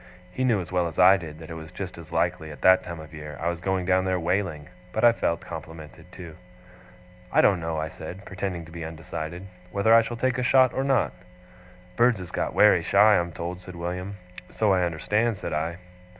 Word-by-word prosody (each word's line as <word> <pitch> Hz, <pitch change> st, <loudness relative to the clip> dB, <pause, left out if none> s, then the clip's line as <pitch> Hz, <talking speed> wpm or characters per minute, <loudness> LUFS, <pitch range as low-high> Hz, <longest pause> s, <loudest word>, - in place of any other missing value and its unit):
He 130 Hz, -, -3 dB
knew 120 Hz, -5 st, +3 dB
as 90 Hz, -2 st, -7 dB
well 90 Hz, -1 st, +1 dB
as 80 Hz, -, -8 dB
I 95 Hz, +2 st, +7 dB
did 80 Hz, -5 st, -7 dB
that 80 Hz, 0 st, -10 dB
it -, -, -4 dB
was 80 Hz, -1 st, -9 dB
just -, -, -6 dB
as -, -, -12 dB
likely, 80 Hz, -, -1 dB
at 75 Hz, -, -11 dB
that 95 Hz, 0 st, +6 dB
time 85 Hz, -2 st, -7 dB
of 80 Hz, +1 st, -11 dB
year, 75 Hz, -1 st, -8 dB
I 85 Hz, -, 0 dB
was 85 Hz, 0 st, -4 dB
going 95 Hz, 0 st, -1 dB
down 95 Hz, +1 st, +3 dB
there 95 Hz, -1 st, 0 dB
whaling; 85 Hz, -3 st, -1 dB, 0.2 s
but 110 Hz, -, -2 dB
I 120 Hz, -, +8 dB
felt 85 Hz, -7 st, -1 dB
complimented, 80 Hz, -2 st, -10 dB
too. 85 Hz, -3 st, -10 dB, 0.9 s
'I -, -, +5 dB
don't 95 Hz, -3 st, +4 dB
know,' 80 Hz, -1 st, -3 dB
I 80 Hz, 0 st, -2 dB
said, 90 Hz, +5 st, -9 dB
pretending 95 Hz, -3 st, -4 dB
to 80 Hz, -, -14 dB
be 85 Hz, 0 st, -7 dB
undecided, 80 Hz, +2 st, -6 dB, 0.3 s
'whether 100 Hz, +4 st, +3 dB
I 115 Hz, -, +8 dB
shall 115 Hz, +1 st, -5 dB
take 130 Hz, +1 st, 0 dB
a -, -, 0 dB
shot 130 Hz, -1 st, +4 dB
or 135 Hz, -, -1 dB
not.' 135 Hz, -3 st, +1 dB, 0.8 s
'Birds 120 Hz, -3 st, +4 dB
is 90 Hz, -1 st, -8 dB
got -, -, -2 dB
wery -, -, +6 dB
shy, 105 Hz, +1 st, +5 dB
I'm 85 Hz, 0 st, -3 dB
told,' 85 Hz, +2 st, -6 dB
said 90 Hz, -1 st, -10 dB
William. 90 Hz, +3 st, -5 dB, 0.3 s
'So 105 Hz, -3 st, +1 dB
I 90 Hz, -1 st, +2 dB
understand,' 105 Hz, +7 st, 0 dB
said -, -, -5 dB
I. 80 Hz, +3 st, -2 dB
90 Hz, 220 wpm, -25 LUFS, 80-100 Hz, 0.9 s, I